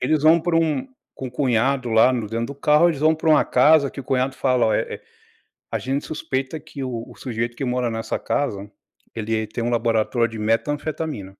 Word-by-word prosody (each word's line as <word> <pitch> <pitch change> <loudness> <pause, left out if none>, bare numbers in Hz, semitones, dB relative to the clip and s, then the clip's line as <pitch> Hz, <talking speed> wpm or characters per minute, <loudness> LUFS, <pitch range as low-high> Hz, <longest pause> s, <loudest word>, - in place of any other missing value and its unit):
Eles 145 +3 +1
vão 160 +2 +6
para 170 0 0
um 165 - +1 0.3
com 130 - -6
o - - -12
cunhado 125 0 +1
lá 115 +3 +5
no 115 -4 -2
dentro 115 +1 -2
do 140 - -6
carro, 150 +4 +4
eles 145 - -5
vão 155 +1 +4
para 160 +1 -2
uma 155 - +5
casa 140 +2 +4
que - - -8
o - - -11
cunhado 130 0 0
fala: 125 -3 +2
"Ó, 110 - +2
é - - +2
é, - - -25 0.7
a - - -1
gente 135 +2 -2
suspeita 135 0 -3
que 145 -2 -8
o 120 -3 -4
o - - -13
sujeito 120 -1 -4
que 135 - -2
mora 125 -1 0
nessa 115 0 -3
casa 105 -8 -2 0.5
ele 110 0 -2
tem 115 +2 -4
um 120 - 0
laboratório 115 0 +1
de 110 -1 -8
metanfetamina." 145 +1 -2
130 Hz, 215 wpm, -22 LUFS, 115-150 Hz, 0.7 s, vão